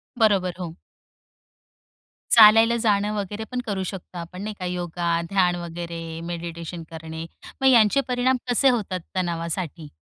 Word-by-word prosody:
बरोबर, 200 -6 +2
हो. 170 -2 -6 1.5
चालायला 225 +1 +8
जाणं 210 -2 +1
वगैरे 205 +2 -4
पण 250 - -2
करू 195 -2 -2
शकतो 185 -1 -7
आपण, 175 +2 -7
नाही 215 +1 -4
का? 185 - -4
योगा, 175 -1 -2 0.2
ध्यान 180 -3 +2
वगैरे, 170 0 -6 0.3
मेडिटेशन 170 0 -6
करणे. 160 0 -7 0.4
मग 265 - +4
यांचे 240 +1 +5
परिणाम 255 +1 +1
कसे 265 +3 +4
होतात 205 -7 -1 0.2
तणावासाठी? 170 -2 -3
185 Hz, 130 wpm, -24 LUFS, 170-215 Hz, 1.5 s, चालायला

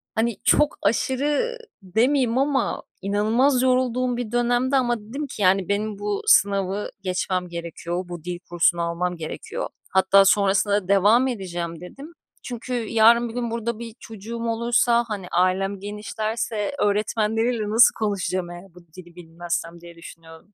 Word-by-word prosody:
Hani 230 -1 0
çok 300 0 +3
aşırı 285 - 0 0.3
demeyeyim 240 +5 +1
ama 275 0 0 0.2
inanılmaz 225 +7 +2
yorulduğum 255 -1 +1
bir 240 -3 -4
dönemdi 245 +2 +1
ama 240 -3 +1
dedim 270 +8 -6
ki 215 - -8
yani, 190 0 +3
"Benim 205 0 -2
bu 205 -1 -2
sınavı 200 0 +3
geçmem 185 -1 -2
gerekiyor. 170 +1 -5
Bu 175 -3 -7
dil 175 0 -5
kursunu 175 0 +2
almam 170 +1 -2
gerekiyor." 155 -1 -6 0.2
Hatta 190 +1 +5
sonrasında 200 +1 +3
da - - -16
devam 210 +6 +4
edeceğim 175 -7 -5
dedim, 275 - -11 0.3
çünkü 250 0 -6
yarın 230 0 +3
bir 225 - -9
gün 240 -2 -3
burada 230 -1 -3
bir 230 -1 -8
çocuğum 225 +2 -8
olursa, 235 +1 +2
hani, 200 -5 -5
ailem 190 +2 +1
genişlerse 210 +2 -3
öğretmenleriyle 215 +2 0
nasıl 225 +3 +6
konuşacağım 185 -4 -2
eğer 175 +1 -12
bu - - -13 0.2
dili 175 -2 -13
bilmezsem 170 0 -5
diye 170 0 -13
düşünüyordum. 165 +3 -14
210 Hz, 145 wpm, -23 LUFS, 185-235 Hz, 0.3 s, nasıl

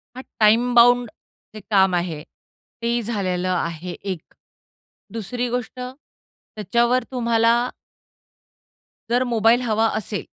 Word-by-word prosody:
हा 255 - -7 0.2
time 230 +3 +4
bound 245 0 +5 0.5
जे 215 - -7
काम 190 -3 +4
आहे 170 -4 -2 0.6
तेही 235 +1 0
झालेलं 185 -5 -2
आहे 170 -1 -2
एक. 185 -2 -6 0.9
दुसरी 240 +3 -3
गोष्ट 245 0 -4
त्याच्यावर 245 -2 -3
तुम्हाला 230 -2 +2 1.6
जर 245 +2 +2
मोबाईल 235 0 +3
हवा 225 -2 +1
असेल, 210 -4 -3
225 Hz, 105 wpm, -22 LUFS, 195-245 Hz, 1.6 s, bound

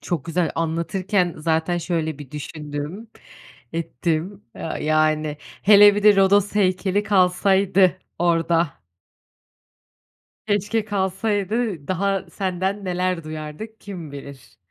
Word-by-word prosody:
Çok 170 -7 -3
güzel. 170 0 0
Anlatırken 175 +3 -1
zaten 160 +2 0
şöyle 160 -3 -2
bir 145 -3 -10
düşündüm, 150 +7 -6 0.6
ettim 170 +5 -3
a 160 - -5
yani. 155 -1 +1
Hele 205 +3 +5
bir 205 - -1
de 210 -1 +6
Rodos 200 +1 +3
heykeli 190 0 +1
kalsaydı 190 -1 +3 0.2
orada. 165 - +1 1.6
Keşke 210 +2 0
kalsaydı, 205 -2 -1
daha 195 +1 -1
senden 190 +1 -2
neler 180 -2 -1
duyardık 155 +8 -7
kim 175 -8 -8
bilir? 140 -2 -11
180 Hz, 100 wpm, -22 LUFS, 160-200 Hz, 1.6 s, de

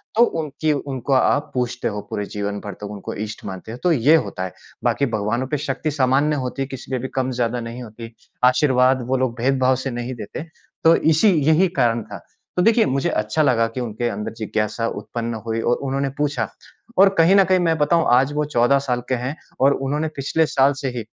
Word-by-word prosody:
तो 235 - +6 0.2
उनकी 155 +1 -2
उनको 135 -1 -3
आप 135 +2 +2
पूजते 125 -1 -2
हो 105 -1 -4
पूरे 105 - -3
जीवन 100 0 -4
भर 100 -2 -6
तक - - -9
उनको 100 -2 -6
इष्ट 110 0 -9
मानते 95 +2 -7
हो, 120 - -7
तो 180 - +3
ये 145 +2 +5
होता 95 -11 -1
है। 95 - -5 0.3
बाकी 140 - +1
भगवानों 115 +5 -1
पे 150 - -1
शक्ति 145 +2 -2
सामान्य 140 +2 +2
होती 130 +2 -4
है, 135 - -1
किसी 135 -1 -9
पे 130 - 0
भी 130 - -4
कम-ज़्यादा 125 -2 -1
नहीं 115 +2 -7
होती। 115 0 -10 0.3
आशीर्वाद 130 0 +3
वो 130 +1 +1
लोग 125 -2 -1
भेदभाव 130 0 +2
से 135 - -1
नहीं 120 +2 -4
देते 110 +6 -7 0.4
तो 165 +1 +7
इसी 160 +7 +3 0.2
यही 175 +4 +5
कारण 115 -2 +2
था।" - - -9 0.4
तो 180 - +4
देखिए, 225 +1 +4
मुझे 135 +1 0
अच्छा 105 +9 0
लगा 115 -4 +3
कि 130 - -2
उनके 120 0 -3
अंदर 105 -1 -4
जिज्ञासा 110 +1 -2
उत्पन्न 115 -1 -4
हुई 115 0 -2
और 120 - +2
उन्होंने 135 +1 -1
पूछा 145 0 -1 0.5
और 195 - +8
कहीं 170 +4 +5
न 195 - +7
कहीं 185 0 +3
मैं 165 -2 +1
बताऊँ 160 +2 +2
आज 135 +3 +3
वो 150 0 0
14 140 -1 +3
साल 125 -3 -2
के 130 - +2
हैं 125 +5 -4 0.3
और 140 +1 +5
उन्होंने 145 +4 -2
पिछले 145 +4 +1
साल 140 -1 +3
से 135 - -1
ही 110 - -4
130 Hz, 210 wpm, -21 LUFS, 115-145 Hz, 0.5 s, और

